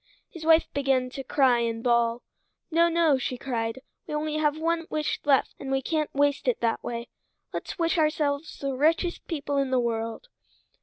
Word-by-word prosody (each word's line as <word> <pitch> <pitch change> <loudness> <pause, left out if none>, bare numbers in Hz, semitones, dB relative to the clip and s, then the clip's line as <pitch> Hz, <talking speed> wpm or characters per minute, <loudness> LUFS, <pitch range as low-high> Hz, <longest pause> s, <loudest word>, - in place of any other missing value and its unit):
His 335 -3 -9
wife 325 0 +5
begun 265 -2 +1
to 270 - -6
cry 260 -3 +3
and 230 -1 -2
bawl. 235 -1 +2 0.5
"No, 335 +1 +4
no," 330 -5 +3
she 255 0 -3
cried. 235 -1 -3 0.3
"We 300 - -3
only 305 0 -1
have 300 -1 +1
one 330 +1 -1
wish 305 -1 -1
left, 275 -2 +3
and 270 - -6
we 270 0 0
can't 310 0 -1
waste 285 - +1
it - - +2
that 230 -1 0
way. 235 0 -5 0.4
Let's - - -5
wish 335 0 +1
ourselves 305 -1 0
the 275 -1 -3
richest 330 +6 +1
people 285 -3 -2
in 275 -1 +1
the 255 -1 +2
world." 230 - -2
285 Hz, 185 wpm, -26 LUFS, 250-315 Hz, 0.5 s, wife